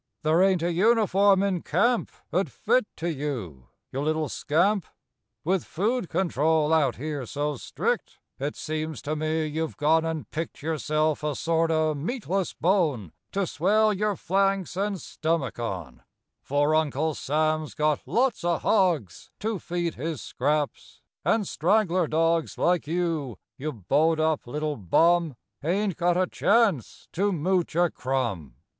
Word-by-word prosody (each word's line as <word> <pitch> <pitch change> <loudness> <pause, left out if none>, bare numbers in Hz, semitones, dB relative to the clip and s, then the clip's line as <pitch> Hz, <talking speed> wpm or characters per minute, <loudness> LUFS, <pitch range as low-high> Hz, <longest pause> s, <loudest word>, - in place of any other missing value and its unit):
There 155 +3 +3
ain't 190 -3 +3
a 175 - +1
uniform 200 0 +4
in 190 -4 0
camp 240 0 +1 0.2
'Ould - - +1
fit - - +1
to 170 +1 -2
you, 115 - -5 0.2
you 135 - -3
little 155 0 0
scamp 185 +6 +1
f - - -28 0.5
With 185 +2 +1
food 215 +2 -1
control 160 -3 +1
out 140 -7 +3
here 145 -1 -4
so 145 +2 -2
strict - - -2 0.2
It 145 +2 -3
seems 155 -6 -4
to 155 - -2
me 155 +1 -1
you've 155 +1 -3
gone 160 +2 +3
and 160 -2 -3
picked 160 -1 -5
Yourself 155 -1 0
a 150 -2 -1
sort 165 +2 +1
o' 155 -1 +2
meatless 190 - -2
bone 155 - +1 0.2
To 195 0 +1
swell 210 +6 +2
your 210 +1 0
flanks 195 +1 0
and 200 +2 -1
stummick 160 -7 -2
on, 90 - -5 0.4
For 145 +2 +1
Uncle 155 0 +1
Sam's 155 +1 -1
got 150 -1 +1
lots 250 -3 +1
o 175 0 +2
r - - -2
hogs 170 - +1
To 215 -1 -1
feed 170 -1 -2
his 155 +2 -4
scraps, 145 +2 -2 0.2
and 215 -4 +1
straggler 185 -1 +2
dogs 165 +1 +1
Like 175 -3 +1
you, 160 - -1 0.2
you 155 +3 -4
bowed 150 - +1
up 155 -4 0
little 150 -3 -3
hum, 170 -4 +4 0.3
Ain't 190 +3 0
got 175 0 +1
a 185 - +3
chance 200 - +1
to 200 +4 +1
mooch 175 0 0
a 175 -1 +3
crumb! 100 - -2
160 Hz, 150 wpm, -26 LUFS, 150-185 Hz, 0.5 s, uniform